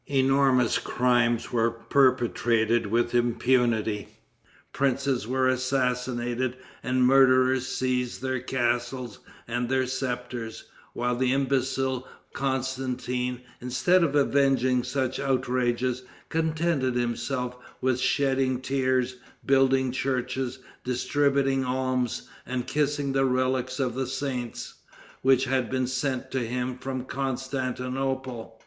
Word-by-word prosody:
Enormous 135 -2 +3
crimes 120 -2 +1
were 115 -1 +3
perpetrated 115 -2 +2
with 120 +3 +1
impunity. 120 -3 +1 0.7
Princes 135 -3 0
were 130 +1 +1
assassinated, 125 -1 0 0.2
and 130 0 -1
the - - +3
murderers 130 0 +5
seized 125 -1 -1
their 130 -1 -2
castles 120 -1 -2 0.3
and 120 +1 -2
their 130 0 +2
scepters, 125 -3 -4 0.3
while 125 0 -1
the 125 +1 +1
imbecile 130 -1 0 0.3
Constantin, 125 -2 -2 0.2
instead 170 +9 +2
of 145 -3 0
avenging 135 -3 +3
such 130 -1 -2
outrages, 125 -2 0 0.3
contented 160 -5 0
himself 125 +1 -2 0.2
with 130 -1 +1
shedding 135 -2 +1
tears, 130 -1 0 0.3
building 135 -1 +3
churches, 130 0 -2 0.3
distributing 135 +1 +1
alms, 130 -1 -1 0.2
and 125 -1 -2
kissing 145 -1 0
the 135 0 +2
relics 130 0 0
of 130 -3 0
the 130 +1 -2
saints, 130 -3 -4 0.5
which 130 0 +4
had 130 -2 0
been 130 -1 0
sent 130 0 -2
to 130 - 0
him 125 +1 -2
from 130 -1 -4
Constantinople. 130 -2 -3
130 Hz, 105 wpm, -26 LUFS, 125-135 Hz, 0.7 s, murderers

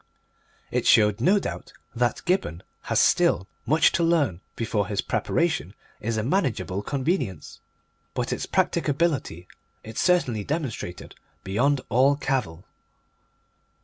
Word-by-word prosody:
It - - 0
showed, 105 -2 +5
no 195 +4 +4
doubt, 200 - -5 0.2
that 120 0 0
Gibberne 175 - 0 0.3
has - - +3
still 95 - +3 0.2
much 155 +4 +4
to - - 0
learn 145 - +1
before 110 -3 -1
his 100 -1 -3
preparation 160 - -1 0.2
is 115 +1 -2
a 110 - 0
manageable 125 - -1
convenience, 130 - -2 0.6
but - - -1
its - - -4
practicability 140 - 0 0.4
it 110 0 -6
certainly 130 - +2
demonstrated 130 - -4 0.3
beyond 130 +8 +1
all 130 +5 +4
cavil. 130 - -2
125 Hz, 115 wpm, -25 LUFS, 105-155 Hz, 0.6 s, showed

